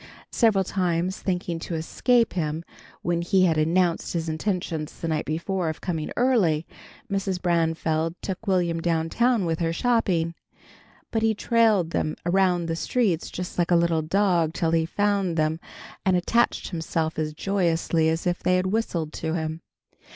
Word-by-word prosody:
Several 215 -5 +3
times, 180 -1 -1
thinking 180 -3 -2
to 165 - -5
escape 230 +9 +1
him 160 -2 -2 0.4
when 170 -1 0
he 185 +2 +3
had 160 -3 +2
announced 170 +2 +1
his 165 -1 -2
intention 160 -2 -2
the 165 - -3
night 155 -2 -1
before 170 +3 -2
of 155 - -5
coming 160 -4 -3
early, 200 -12 +2 0.4
Mrs. 195 -3 -1
Branfield 165 -2 0
took 195 +3 -5
Will'm 175 -3 +1
down 165 -1 0
town 235 -1 +2
with 165 -1 -1
her, 165 -1 0
shopping. 175 -5 +1 0.8
But 225 - 0
he 220 0 +2
trailed 215 -6 +2
them 155 - -1
around 180 -1 +2
the 165 0 -2
streets 190 -2 0
just 180 0 -6
like 175 - +2
a 175 - +4
little 170 -1 +2
dog 170 -1 +1
till 165 -2 0
he 165 -1 +2
found 200 -2 0
them, 155 +1 +1 0.4
and 185 -1 +3
attached 235 +7 +1
himself 160 -2 -2
as 155 -1 -2
joyously 165 -4 +1
as 160 +2 -1
if 175 -1 0
they 180 - +2
had 185 0 +1
whistled 185 -6 -1
to 160 0 -3
him. 160 0 -3
170 Hz, 165 wpm, -25 LUFS, 160-190 Hz, 0.8 s, a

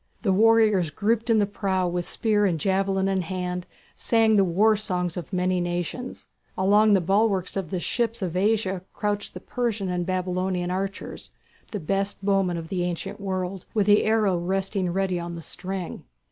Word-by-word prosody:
The 195 -4 +3
warriors 215 -4 +4
grouped 225 +8 0
in 225 - +5
the 205 - +4
prow 190 -2 -1
with 175 0 -2
spear 210 -2 +2
and 170 -4 -1
javelin 195 +1 +1
in 190 -1 +1
hand 180 0 -4 0.3
sang 225 -2 +3
the 200 - +5
war 200 +5 +3
songs 180 -5 -2
of 175 0 -6
many 185 0 +1
nations. 175 +8 -4 0.3
Along 205 +3 +4
the 195 - +5
bulwarks 195 0 +1
of 190 -5 -3
the 185 - -2
ships 230 +2 -1
of 180 -2 -3
Asia 195 -1 +1
crouched 205 -1 -2
the - - -5
Persian 225 -6 -2
and 180 -1 -1
Babylonian 185 0 -1
archers, 190 +1 -4 0.4
the 210 - -4
best 195 +3 -2
bowmen 195 -3 +2
of 165 -1 -6
the 180 -2 -1
ancient 175 +2 -4
world, 185 -1 -3
with 210 -2 +3
the 205 0 +5
arrow 215 -5 +2
resting 190 +1 -1
ready 185 -1 0
on 170 0 -5
the 170 - -7
string. 185 0 -5
190 Hz, 175 wpm, -25 LUFS, 180-205 Hz, 0.4 s, in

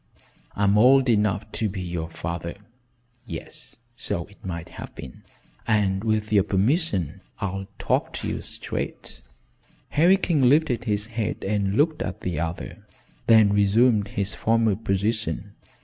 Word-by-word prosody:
I'm 100 0 +3
old 130 +2 +6
enough 105 -1 +1
to 110 - -1
be 95 0 -5
your 85 -2 -4
father 85 +1 -5 0.7
yes 80 - -8 0.2
so 100 -8 -2
it 100 - -21
might 85 -3 -5
have - - -9
been 65 - -10 0.5
and 100 -3 +2
with 110 -1 0
your 100 -2 +5
permission 100 - 0 0.2
I'll 95 -1 -3
talk - - 0
to - - -4
you - - -3
straight." - - -5 0.7
Harry 175 +6 +5
King 150 -9 +3
lifted 130 -4 +2
his 105 -2 0
head 110 -2 -2
and 100 -1 0
looked 155 +4 +2
at 90 - -4
the 85 -5 -2
other, 85 0 -5 0.4
then 110 -3 +6
resumed 105 +1 +3
his 100 0 -1
former 115 -2 +2
position. 105 +1 -2
105 Hz, 140 wpm, -24 LUFS, 95-115 Hz, 0.7 s, old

